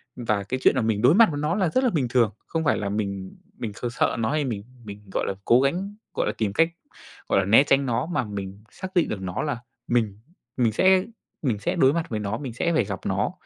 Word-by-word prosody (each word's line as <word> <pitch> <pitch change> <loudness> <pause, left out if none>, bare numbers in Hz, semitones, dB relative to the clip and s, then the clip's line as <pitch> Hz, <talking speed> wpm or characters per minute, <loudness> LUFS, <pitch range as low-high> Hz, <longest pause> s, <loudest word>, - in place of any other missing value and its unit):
Và 110 -4 -1
cái 130 +7 -3
chuyện - - +5
là - - +2
mình 110 -2 0
đối 125 +8 +6
mặt 225 +1 +7
với 145 - -3
nó 155 +3 0
là 190 -4 +1
rất 255 +10 +1
là 255 - +4
bình 150 - 0
thường. 120 -3 +2 0.2
Không 165 -1 -2
phải 145 - +2
là 100 - -2
mình 100 -2 -4 0.2
mình 110 -4 -4
kh 115 - -7
sợ - - +1
nó 110 +2 0
hay 150 -1 0
mình 110 -6 -3 0.2
mình, 105 -1 -10
gọi - - 0
là, - - -1
cố 120 +2 +5
gắng, 185 +9 -1 0.2
gọi - - 0
là, - - 0
tìm 105 -3 -1
cách, 165 +8 +3 0.6
gọi - - +4
là, 95 - +1
né 110 +7 +6
tránh 140 -1 +2
nó 125 -1 0
mà 165 -6 -1
mình 100 -1 -7
xác 185 - -6
định 175 - +3
được 100 - -4
nó 90 -1 -3
là 145 -6 -2 0.3
mình 110 -4 0 0.4
mình 120 -3 +3
sẽ 185 - +4 0.4
mình 120 -8 0
sẽ 100 - -1
đối 135 +1 +4
mặt 165 0 -2
với 110 - -2
nó, 105 +1 -2
mình 130 -2 -6
sẽ 170 +8 0
phải 140 -9 +2
gặp 100 -2 -4
nó. - - 0
120 Hz, 265 wpm, -25 LUFS, 105-150 Hz, 0.6 s, mặt